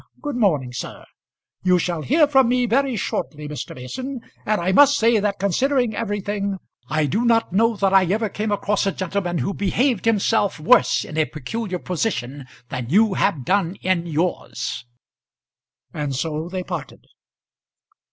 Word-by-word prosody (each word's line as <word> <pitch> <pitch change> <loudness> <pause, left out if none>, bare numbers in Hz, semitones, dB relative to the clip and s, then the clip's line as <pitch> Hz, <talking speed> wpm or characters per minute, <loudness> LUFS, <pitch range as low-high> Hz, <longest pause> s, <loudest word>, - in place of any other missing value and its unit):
Good 290 -3 -4
morning, 150 - +1
sir. 125 - -7 0.6
You 180 -1 +3
shall 175 -2 -1
hear 300 - +4
from 265 -4 +4
me 250 0 +2
very 260 +2 +1
shortly, 150 -6 -3
Mr. 150 -1 -6
Mason; 255 - -6 0.3
and 215 0 +2
I 175 +2 0
must 285 +7 +6
say 230 0 +3
that, 205 -1 -1
considering 245 +4 +1
everything, 205 -2 -2 0.3
I 155 -1 +1
do 210 - 0
not 230 -5 +2
know 230 +3 +3
that 195 -1 +1
I 190 -1 +6
ever 215 +5 0
came 210 +1 -3
across 205 0 0
a - - +2
gentleman 185 -1 -2
who 160 +8 -1
behaved 220 +4 0
himself 210 -4 +2
worse 140 -4 +4
in 155 - -4
a 155 - +3
peculiar 185 - -4
position 145 - -3 0.2
than 125 -3 -5
you 210 +5 +4
have 165 -10 0
done 190 0 +1
in 175 -2 0
yours." 155 -7 -2 1.1
And 145 -3 -3
so 155 +4 -3
they 185 0 -4
parted. 175 -5 -7
195 Hz, 160 wpm, -22 LUFS, 160-225 Hz, 1.1 s, must